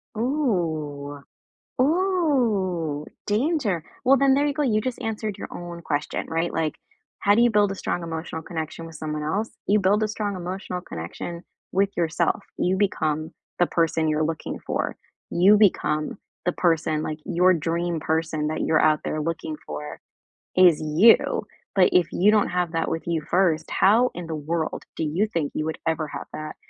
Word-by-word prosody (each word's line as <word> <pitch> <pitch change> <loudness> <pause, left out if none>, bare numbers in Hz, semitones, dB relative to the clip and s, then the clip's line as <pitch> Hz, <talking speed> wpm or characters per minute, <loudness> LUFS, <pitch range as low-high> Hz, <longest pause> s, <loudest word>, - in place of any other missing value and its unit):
Ooh. 165 - -1 0.6
Ooh! 245 - +1 0.2
Danger. 220 - 0 0.2
Well, 270 +2 +6
then 275 0 +4
there 285 +1 +2
you 290 - 0
go, 300 - -2
you 225 -7 +2
just 255 0 -4
answered 215 -2 -3
your - - -6
own 175 -1 -7
question, 150 -2 -2
right? 165 +1 -1
Like, 160 -2 -1 0.4
how 205 - +4
do 235 - +4
you 240 - +5
build 205 -2 +3
a - - -4
strong 175 -2 -3
emotional 160 0 -5
connection 165 0 -5
with 165 -1 -11
someone 150 0 -4
else? 205 +9 -1 0.2
You 210 +1 +4
build 205 +3 +3
a - - +1
strong 205 -2 -3
emotional 180 0 -5
connection 170 - -6 0.3
with 195 +1 +2
yourself. 170 0 +1
You 185 +1 +1
become 155 -5 0 0.3
the 175 - +5
person 165 -2 +1
you're 155 0 +1
looking 160 0 -4
for. - - -1 0.4
You 195 +4 +6
become 155 -6 +2 0.3
the 180 - +3
person, 160 -3 +1
like, 155 -1 -3
your 180 +2 +4
dream 170 0 -1
person 160 -1 -1
that 155 +1 -2
you're 155 - +3
out 155 -1 +4
there 155 - -2
looking 160 -1 -3
for 75 0 -6 0.6
is 180 -4 +6
you. 155 +9 +4 0.3
But 185 - +5
if 180 -2 +4
you 200 +4 +4
don't 210 -1 +3
have 180 -2 -1
that 165 -1 -1
with 165 - -2
you 165 -2 -1
first, 175 -4 +2
how 230 +6 +4
in 175 -1 -6
the 160 - -4
world 160 +2 -2
do 160 - -1
you 175 +8 0
think 155 -4 -1
you 155 - -2
would 160 - -2
ever 160 -1 0
have - - -7
that 155 0 -6
170 Hz, 180 wpm, -24 LUFS, 155-205 Hz, 0.6 s, Well